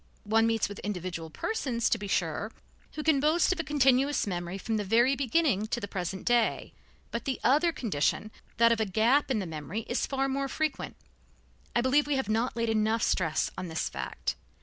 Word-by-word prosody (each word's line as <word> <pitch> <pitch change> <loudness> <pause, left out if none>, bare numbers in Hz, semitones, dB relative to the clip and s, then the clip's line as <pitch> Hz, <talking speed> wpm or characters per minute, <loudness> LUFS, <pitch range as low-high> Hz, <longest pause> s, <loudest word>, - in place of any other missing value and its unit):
One 225 +2 +3
meets 225 -2 +1
with 205 0 -8
individual 180 -5 -4
persons, 245 - -1
to 230 - +2
be 205 - -5
sure, 185 +3 -1 0.4
who 305 - -5
can 310 -3 +3
boast 315 +6 +3
of 355 - -9
a - - 0
continuous 275 -1 +3
memory 175 -1 -3
from 220 +3 -2
the 210 - -1
very 235 +7 +3
beginning 265 - +1
to 240 - -2
the 205 - -5
present 190 -1 -4
day, 240 -2 +1 0.4
but 235 - -4
the 265 -2 -2
other 300 +7 +4
condition, 215 - -1 0.3
that 230 0 +5
of 230 - +2
a 220 - +2
gap 230 +10 +2
in 260 - +1
the 200 - -2
memory, 160 +5 -5
is 240 +3 -2
far 270 0 0
more 275 +1 -1
frequent. 310 +2 -2 0.8
I 240 - +4
believe 275 +4 +3
we 295 - +1
have 265 -6 -2
not 225 +3 0
laid 230 -1 0
enough 220 +1 +1
stress 160 -4 +1
on 185 - -4
this 160 -1 -2
fact. - - -4
230 Hz, 200 wpm, -29 LUFS, 200-270 Hz, 0.8 s, that